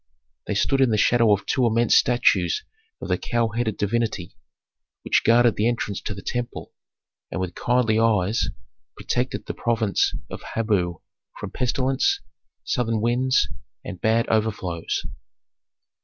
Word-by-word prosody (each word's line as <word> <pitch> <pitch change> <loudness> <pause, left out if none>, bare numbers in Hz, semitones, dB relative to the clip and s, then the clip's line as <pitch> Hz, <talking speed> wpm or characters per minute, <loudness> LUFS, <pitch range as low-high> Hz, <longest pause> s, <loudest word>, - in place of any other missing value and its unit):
They - - -1
stood 135 0 +2
in 130 - +4
the 110 - +1
shadow 115 0 +4
of 100 -1 +1
two 125 -3 +2
immense 115 +1 +3
statues 100 -8 +3 0.4
of - - -4
the - - 0
cow 115 -1 0
headed 110 -1 -2
divinity 105 -4 -2 0.7
which - - +2
guarded 120 0 +4
the 105 - +2
entrance 115 -4 -2
to 105 - -5
the 95 - -9
temple 120 -1 -4 0.6
and - - -4
with 90 -1 -3
kindly 120 -3 +1
eyes 110 -1 +2 0.5
protected 125 +1 -2
the - - -4
province 115 -4 0 0.2
of - - -6
Habu 95 -7 0 0.4
from - - -6
pestilence, 130 - +1 0.4
southern 115 -4 0
winds, 125 +3 +2 0.4
and 95 -4 -7
bad 115 +1 +2
overflows. 105 -6 -1
115 Hz, 140 wpm, -23 LUFS, 105-120 Hz, 0.7 s, in